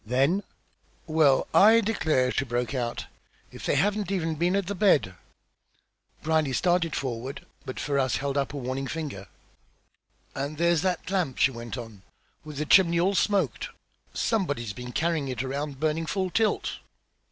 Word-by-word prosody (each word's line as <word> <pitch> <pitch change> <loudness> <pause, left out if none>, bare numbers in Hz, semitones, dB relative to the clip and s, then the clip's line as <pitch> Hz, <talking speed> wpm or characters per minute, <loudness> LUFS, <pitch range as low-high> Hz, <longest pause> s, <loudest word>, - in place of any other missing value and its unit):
Then 135 - +2 0.6
"Well, 155 -4 +3
I 220 +3 +7
declare!" 160 - +1
she - - 0
broke 120 -1 -2
out. 120 -3 -3 0.5
"If - - -8
they - - +2
haven't 205 -1 +1
even 165 -4 0
been 175 +4 +1
at 200 -1 0
the 200 - -3
bed!" 180 - +3 1.1
Brierly 155 -3 +1
started 175 +1 +1
forward, 130 +1 -4 0.2
but 130 - -5
Ferrars 140 -3 0
held 140 0 -2
up 140 -2 0
a 145 - -6
warning 130 +1 -3
finger. 140 - -5 1.1
"And 140 +2 -4
there's 170 -1 +3
that 185 -1 -2
lamp!" 180 -10 0
she 130 - +4
went 115 0 -7
on, 115 -5 -9 0.4
"with 150 -2 -9
the 150 - -1
chimney 170 0 +5
all 190 +3 +2
smoked! 190 - 0 0.4
Somebody's 145 - -1
been 125 +1 -7
carrying 160 -1 0
it 130 -1 -3
around 140 +1 -4
burning 160 +1 0
full 190 0 -1
tilt." 220 +2 0
150 Hz, 155 wpm, -27 LUFS, 130-175 Hz, 1.1 s, I